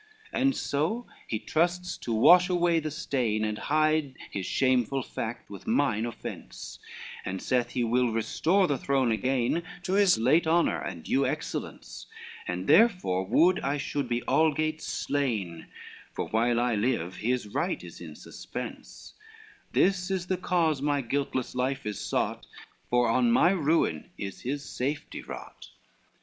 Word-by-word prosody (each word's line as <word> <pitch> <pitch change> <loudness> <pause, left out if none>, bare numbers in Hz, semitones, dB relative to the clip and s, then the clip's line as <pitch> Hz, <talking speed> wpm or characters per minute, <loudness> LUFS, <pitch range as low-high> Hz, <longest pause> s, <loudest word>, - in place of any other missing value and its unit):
LX - - -1
"And 270 0 +3
so 170 +13 -1 0.2
he 110 - -1
trusts 175 +8 0
to 120 - -5
wash 175 +11 +6
away 175 -2 +3
the 155 -1 -3
stain, 120 -7 -1
And 105 0 -3
hide 155 -2 +1 0.2
his 95 -2 -4
shameful 130 0 +1
fact 115 +1 -5
with 100 - -10
mine 120 - +1
offence, 115 - -8 0.4
And 95 +1 -4
saith 125 +2 0
he 125 - 0
will 120 +1 +2
restore 160 - +2
the 145 -6 0
throne 135 -3 +1
again 130 +6 +1 0.2
To 185 - -2
his 200 - +5
late 145 +9 +3
honor 170 +1 +3
and - - -6
due - - +1
excellence, - - -5 0.4
And - - -3
therefore 180 - +4
would 180 - +4
I 140 +1 -1
should 140 -2 -3
be 120 0 0
algates 155 +1 +1
slain, 110 - -2 0.5
For - - -3
while 115 +2 +2
I 120 0 +1
live, 105 -5 -1
his 120 -1 -1
right 170 - -2
is - - -11
in - - -9
suspense, - - -8 0.6
This 185 -1 +2
is 190 -2 -1
the 185 0 -1
cause 165 -5 +1
my 145 -1 +1
guiltless 130 0 -2
life 130 +1 -1
is 105 -1 -3
sought, - - -2 0.4
For 120 0 +3
on 120 +1 +3
my 175 +9 +5
ruin 155 - +1
is 100 -1 -6
his 140 +3 -3
safety 140 +4 -4
wrought. - - -10
135 Hz, 155 wpm, -28 LUFS, 120-165 Hz, 0.6 s, wash